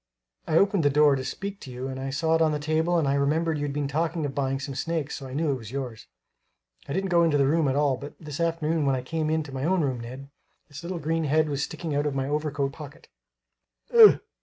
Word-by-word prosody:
I 160 - +2
opened 200 -1 +3
the 145 - +3
door 145 0 +4
to 130 - -3
speak 195 +9 -5
to 130 - -10
you 125 +2 -5
and 130 0 -5
I 135 +1 -4
saw 160 +4 0
it 165 - +3
on 160 -1 +4
the 150 - 0
table 160 +3 +1
and 155 -4 +1
I 135 - +2
remembered 155 +3 +1
you'd 145 -1 -2
been 145 0 -2
talking 160 +2 -1
of 140 - -4
buying 135 -1 -1
some 140 0 -5
snakes, 155 +1 -3
so 135 - -8
I 130 - -7
knew 155 0 +1
it 135 - -1
was 115 -4 -10
yours. 130 -5 -6 0.8
I - - -2
didn't 190 +1 -1
go 170 -1 +5
into 160 -3 +3
the 140 - +3
room 155 +2 +2
at 130 - +1
all, 145 -3 +2
but 145 +3 -9
this 150 -2 -7
afternoon 165 -2 0
when 135 - +3
I 125 - -4
came 155 +3 -2
into 155 -2 -1
my 130 0 -4
own 180 +3 +2
room, 130 -4 -1
Ned, 130 +4 -9 0.4
its 145 - -8
little 175 +1 -4
green 165 +1 -1
head 155 +1 +2
was 140 -1 -2
sticking 160 +1 -4
out 145 +1 +1
of 140 - -2
my 135 0 -1
overcoat 145 -2 -1
pocket 150 -1 -11 0.8
ugh! 455 -2 +8
150 Hz, 260 wpm, -26 LUFS, 135-160 Hz, 0.8 s, ugh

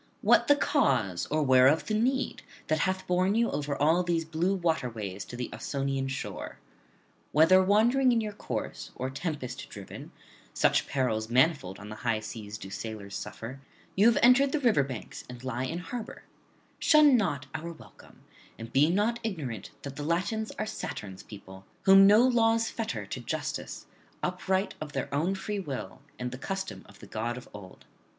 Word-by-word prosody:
what - - +5
the 290 - +6
cause 110 - +1
or 155 +1 +1
whereof 130 +3 +5
the 215 - -2
need 260 +5 0 0.2
that 155 0 0
hath 190 +2 0
borne 185 +3 +2
you 230 +1 +2
over 145 0 -2
all 160 +5 +3
these 170 -2 0
blue 170 +4 0
waterways 115 - -2
to 120 - -9
the 120 -1 -3
Ausonian 135 -1 -2
shore? 130 0 -5 0.7
Whether 165 +5 +6
wandering 235 +7 +4
in 235 - +3
your 215 -2 -3
course, - - -5
or 130 +1 -3
tempest 140 -3 -5
driven 100 -2 -9 0.4
(such - - +2
perils 115 -5 -1
manifold 130 - +2
on 105 +1 -10
the 110 - -7
high 115 -2 0
seas 110 -1 -7
do 95 -3 -9
sailors 105 -2 -6
suffer), 130 +4 -7 0.3
you 205 +4 +5
have 235 - +4
entered 270 +3 +6
the 305 - +2
river 235 - +4
banks 130 -4 -7
and 125 0 -9
lie 130 0 -2
in 165 +5 -3
harbour; 220 +5 -7 0.6
shun 305 -3 +6
not 145 - 0
our 165 +2 -5
welcome, 165 - -16 0.3
and 115 0 -9
be 145 +4 +5
not 210 +6 +1
ignorant 150 - -4
that 140 -1 -7
the 145 - -4
Latins 185 +8 -1
are 215 - -1
Saturn's 105 - -6
people, 95 -2 -12 0.2
whom 195 0 +8
no 215 +5 +6
laws 225 -2 +2
fetter 225 -1 -4
to - - -5
justice, - - -4 0.4
upright 185 +2 0
of 150 -1 -6
their 135 0 -3
own 165 +7 +1
free 205 +1 -3
will 140 -9 -6 0.2
and 125 0 -4
the 125 - -7
custom 190 +4 -4
of 105 - -16
the - - -10
god 115 +3 -3
of 125 - -10
old. 95 -3 -12
155 Hz, 175 wpm, -29 LUFS, 125-200 Hz, 0.7 s, whom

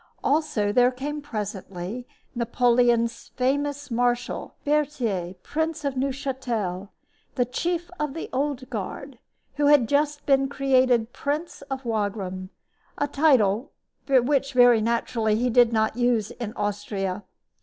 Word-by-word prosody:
Also, 270 -8 +1
there 245 +3 +5
came 285 +4 -5
presently 210 -2 -5 0.3
Napoleon's 240 -1 +2
famous 285 +2 -1
marshal, 245 +1 -1
Berthier, 250 -12 0
Prince 320 0 -2
of 280 -1 -1
Neuchatel, 255 -8 -2 0.5
the 245 - +2
chief 345 +8 -2
of 300 -1 -2
the 325 - -4
Old 270 -1 -1
Guard, 240 +4 -5 0.4
who 290 -1 +3
had 290 -5 +5
just 290 +1 0
been 270 -1 +3
created 255 -4 +2
Prince 300 +6 -3
of 265 -1 -4
Wagram 200 -4 -2 0.5
a 290 - 0
title 270 -4 +2 0.3
which, 275 +1 +2
very 245 -3 +6
naturally, 225 -1 0
he 245 +3 +1
did 240 0 +5
not 220 -1 +1
use 240 -3 +1
in 235 -4 -5
Austria. 205 -1 -3
245 Hz, 125 wpm, -25 LUFS, 220-280 Hz, 0.5 s, very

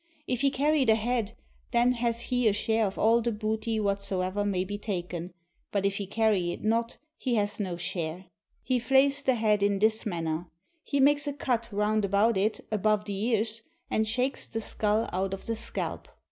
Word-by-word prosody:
If 250 -4 -1
he 280 - +4
carry 290 +2 +2
the 225 -3 +4
head, 230 -1 -1 0.3
then 240 +1 +3
hath 235 -1 -1
he 245 -1 +1
a 210 - +4
share 220 +1 +1
of 195 - -6
all 230 +2 +4
the 235 +1 0
booty 220 +1 -2
whatsoever 200 -1 -1
may 195 -3 0
be 205 +2 -5
taken, 180 -4 -4 0.4
but 200 -1 0
if 200 0 +1
he 200 - -4
carry 205 -4 +1
it - - -7
not, 230 +2 0 0.2
he 250 -3 0
hath 205 -1 -1
no 185 -4 -2
share. 170 +1 -4 0.4
He 255 -1 +1
flays 275 +3 +3
the 265 -3 +2
head 215 -3 +2
in 200 0 +2
this 220 +2 +2
manner. 165 -2 -2 0.4
He 280 - -1
makes 290 +1 +4
a 285 - -1
cut 245 -4 -1
round 210 +1 +1
about 200 +3 +3
it 205 +3 0
above 215 0 +1
the 205 - -4
ears, 220 +2 +1 0.3
and 220 0 +1
shakes 250 +5 -1
the 225 - -4
skull 215 0 0
out 190 +1 -1
of 195 - -13
the 230 - -1
scalp. 230 +1 -4
215 Hz, 195 wpm, -28 LUFS, 200-235 Hz, 0.4 s, he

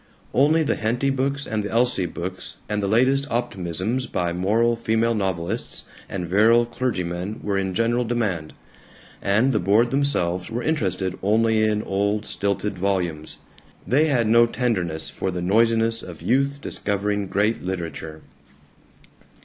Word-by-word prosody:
Only 155 +5 +4
the 145 - 0
Henty 120 +5 0
books 140 +2 -1
and 110 -1 -2
the 105 - -4
Elsie 115 -6 +1
books 90 +3 -6
and 105 -1 -1
the 100 - -1
latest 130 +6 +2
optimisms 110 +1 -2
by 85 -1 -1
moral 110 +6 +2
female 115 0 +1
novelists 95 -5 -2 0.2
and 90 -3 -4
virile 110 +6 +4
clergymen 100 -5 -3
were 100 -1 -1
in 95 -1 -1
general 120 +4 +1
demand, 105 -10 -2 0.7
and 110 +7 +2
the 105 - +2
board 105 +6 +3
themselves 90 -11 0
were 120 +2 -3
interested 95 - -1
only 110 +2 +2
in 105 0 +1
old, 100 +2 -1
stilted 100 -1 -2
volumes. 90 -5 -2 0.4
They 145 +6 +3
had 130 -7 +2
no 115 +2 +5
tenderness 95 -11 -1
for 95 - -3
the 90 -1 -3
noisiness 115 +3 +2
of 85 -3 -10
youth 140 +3 +1
discovering 100 -2 -1
great 105 +4 0
literature. 80 -4 -5
105 Hz, 140 wpm, -23 LUFS, 95-120 Hz, 0.7 s, no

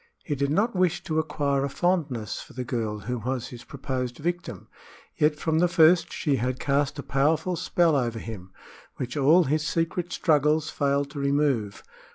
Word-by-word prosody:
He 150 - -2
did 140 0 0
not 205 +9 +1
wish 180 -2 +1
to 160 -1 -1
acquire 140 -3 0
a 140 - -1
fondness 140 - -1
for - - -13
the 125 - -4
girl 110 -4 -3
who 125 +4 -3
was 125 +1 -3
his 120 -1 -10
proposed 130 -2 -4
victim, 175 +3 -4 0.5
yet 150 0 +2
from 160 +1 0
the 180 - +4
first 170 0 +4
she 145 -4 0
had 125 +2 -2
cast 140 +1 0
a 140 - -5
powerful 155 +6 +1
spell 170 -1 +2
over 120 -4 0
him, 105 -5 -8 0.4
which 125 -1 -5
all 155 +5 +5
his 155 +1 0
secret 165 +2 -1
struggles 150 -1 +2
failed 140 0 0
to 145 - -6
remove. 140 -7 0
140 Hz, 180 wpm, -26 LUFS, 125-160 Hz, 0.5 s, all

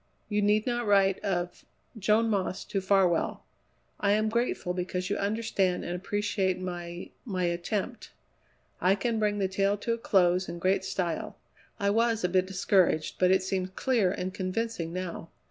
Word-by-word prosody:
You 210 -1 +1
need 210 +1 +3
not 240 -2 -1
write 195 -2 +4
of 175 -3 -2 0.3
Joan 220 +2 +2
Moss 195 -2 -1
to 195 - -2
Farwell. 190 -3 +2 0.6
I 200 0 +3
am 215 +1 +2
grateful 235 -6 -1
because 180 +1 -3
you - - +2
understand 200 -3 0
and 175 - -3
appreciate 195 -1 -1
my 175 -1 -6
my 190 -7 -2
attempt. 185 +7 -2 0.7
I 185 +2 +4
can 230 +1 -1
bring 210 -1 +1
the 195 -2 +1
tale 195 +2 +1
to 230 +3 -1
a 230 - -4
close 185 -3 +2
in 170 - -5
great 185 +2 +1
style. 175 -4 -3 0.4
I 200 0 +2
was 230 +1 +2
a 180 - +2
bit 185 +1 +2
discouraged, 185 -4 +2
but 180 - +4
it 190 0 +4
seems 185 -1 -1
clear 230 -8 +2
and 185 -1 -3
convincing 190 -2 -2
now. 175 -2 -5
195 Hz, 165 wpm, -28 LUFS, 180-210 Hz, 0.7 s, write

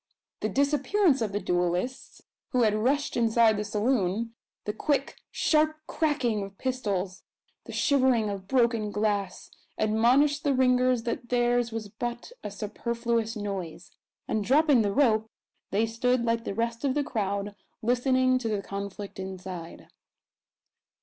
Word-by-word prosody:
The - - -1
disappearance 285 - +2
of 215 -3 -1
the 205 - -1
duellists, 180 +8 -2 0.3
who 250 -1 +3
had 215 -2 +3
rushed 265 +7 0
inside 230 -1 +4
the 210 - -2
saloon, 215 0 0 0.3
the 210 - -2
quick, 275 +4 -1
sharp 310 0 +2
cracking 260 -11 0
of 195 0 -8
pistols; 205 -8 -2 0.4
the - - -8
shivering 260 -6 +2
of 195 -2 -5
broken 235 -3 +2
glass, 205 -2 -2 0.3
admonished 250 +7 +3
the 280 -2 +2
ringers 250 -1 +3
that 235 0 -4
theirs 240 -1 +2
was 220 -1 -4
but 240 - -5
a - - -4
superfluous 230 +2 -2
noise; 190 -5 -5 0.4
and, 215 - 0
dropping 280 +1 +4
the 205 -2 +1
rope, 220 -3 +2 0.4
they 210 +3 +2
stood 235 +2 0
like 230 0 0
the 195 - -3
rest 230 +1 -2
of 275 -1 +1
the 295 - +1
crowd, 200 -4 -2 0.3
listening 255 +2 +2
to 230 -3 -3
the 205 -2 -1
conflict 200 0 -6
inside. 185 -3 -7
230 Hz, 140 wpm, -27 LUFS, 205-255 Hz, 0.4 s, inside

